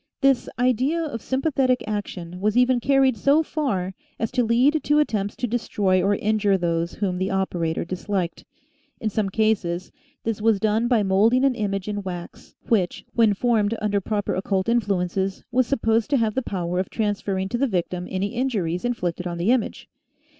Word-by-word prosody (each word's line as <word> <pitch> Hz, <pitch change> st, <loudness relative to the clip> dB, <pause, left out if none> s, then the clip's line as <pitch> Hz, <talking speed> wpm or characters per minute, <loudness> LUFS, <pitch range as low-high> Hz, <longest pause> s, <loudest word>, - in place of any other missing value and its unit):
This 270 Hz, -3 st, +3 dB
idea 255 Hz, +6 st, +2 dB
of 255 Hz, -8 st, -4 dB
sym 265 Hz, +3 st, -2 dB
pathetic 260 Hz, -5 st, +2 dB
action 185 Hz, -4 st, -5 dB
was 215 Hz, +3 st, +1 dB
even 250 Hz, 0 st, +4 dB
carried 270 Hz, -1 st, +3 dB
so 280 Hz, +8 st, +3 dB
far 200 Hz, -, -2 dB, 0.2 s
as 225 Hz, -, -2 dB
to 250 Hz, -1 st, +1 dB
lead 255 Hz, +7 st, +3 dB
to 295 Hz, -, +2 dB
attempts 210 Hz, -9 st, 0 dB
to -, -, -2 dB
destroy 205 Hz, -5 st, +1 dB
or 200 Hz, +2 st, +2 dB
injure 205 Hz, -1 st, +1 dB
those 170 Hz, -1 st, -1 dB
whom 185 Hz, -3 st, -2 dB
the 190 Hz, +1 st, 0 dB
operator 175 Hz, -5 st, -1 dB
disliked. 185 Hz, 0 st, -3 dB, 0.6 s
In 215 Hz, -, -2 dB
some 205 Hz, -1 st, 0 dB
cases 190 Hz, -4 st, 0 dB, 0.3 s
this 220 Hz, -2 st, -2 dB
was 220 Hz, -2 st, +3 dB
done 220 Hz, +3 st, +1 dB
by 235 Hz, -4 st, +3 dB
moulding 220 Hz, +7 st, +3 dB
an 270 Hz, -, +3 dB
image 200 Hz, -4 st, -2 dB
in 205 Hz, -1 st, -2 dB
wax 175 Hz, -3 st, -8 dB
which, 195 Hz, -6 st, 0 dB
when 225 Hz, -3 st, +4 dB
formed 225 Hz, -1 st, +1 dB
under 205 Hz, -1 st, 0 dB
proper 205 Hz, +1 st, -1 dB
occult 190 Hz, 0 st, -1 dB
influences, 195 Hz, -4 st, 0 dB
was 250 Hz, 0 st, +2 dB
supposed 225 Hz, -3 st, +1 dB
to 285 Hz, -, +3 dB
have 225 Hz, -3 st, +1 dB
the 260 Hz, -, 0 dB
power 180 Hz, -5 st, -2 dB
of 185 Hz, -, -2 dB
transferring 200 Hz, -3 st, -1 dB
to 240 Hz, -, -2 dB
the 275 Hz, -, +2 dB
victim 180 Hz, -3 st, -2 dB
any 195 Hz, +3 st, -2 dB
injuries 205 Hz, -9 st, -1 dB
inflicted 180 Hz, -7 st, -2 dB
on 170 Hz, -1 st, -4 dB
the 180 Hz, +7 st, +2 dB
image. 250 Hz, -4 st, -1 dB
210 Hz, 180 wpm, -23 LUFS, 190-245 Hz, 0.6 s, even